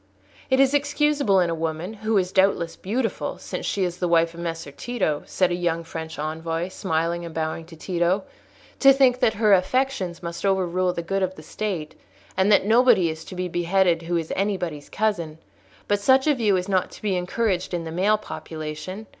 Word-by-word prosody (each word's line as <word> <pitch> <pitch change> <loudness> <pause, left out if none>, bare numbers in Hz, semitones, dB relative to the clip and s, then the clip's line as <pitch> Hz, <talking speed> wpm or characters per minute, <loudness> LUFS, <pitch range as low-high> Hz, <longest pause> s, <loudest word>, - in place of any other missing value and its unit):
"It 260 0 +3
is 270 0 +4
excusable 290 -7 +2
in 175 -2 +2
a - - 0
woman, 165 +4 -3
who 220 0 0
is 185 -1 +1
doubtless 190 -4 +2
beautiful, 225 +4 -2
since - - -5
she 195 - 0
is 175 -1 -2
the 180 - 0
wife 165 -1 +3
of 170 - -11
Messer 165 -3 -4
Tito," 185 - -2
said 185 -2 +1
a - - +1
young 170 -1 -1
French 160 -1 -7
envoy, 165 +3 -3
smiling 170 -2 -1
and 170 -1 -8
bowing 160 0 -3
to 170 - -12
Tito, 175 +3 0 0.6
"to 275 -1 +8
think 260 -2 +4
that 220 - +2
her 215 -1 +4
affections 190 -4 0
must 170 0 -5
overrule 185 -2 +1
the 170 - -4
good 195 +3 -1
of 185 0 -1
the 155 - -12
State, 180 -4 -4 0.4
and 190 +2 +3
that 200 - +5
nobody 220 -6 +5
is 160 0 -8
to 185 - -9
be 180 0 -2
beheaded 175 0 +2
who 170 +1 -1
is 165 -1 -3
anybody's 180 -7 -2
cousin; 180 -8 -1 0.5
but 205 0 +2
such 265 +5 +4
a 305 - +4
view 215 -7 +2
is 180 +1 -3
not 190 -2 +1
to - - -13
be 200 -3 +1
encouraged 185 +1 -1
in 175 -2 -2
the 160 - -6
male 195 +6 +2
population. 160 +1 -7
185 Hz, 200 wpm, -24 LUFS, 165-210 Hz, 0.6 s, to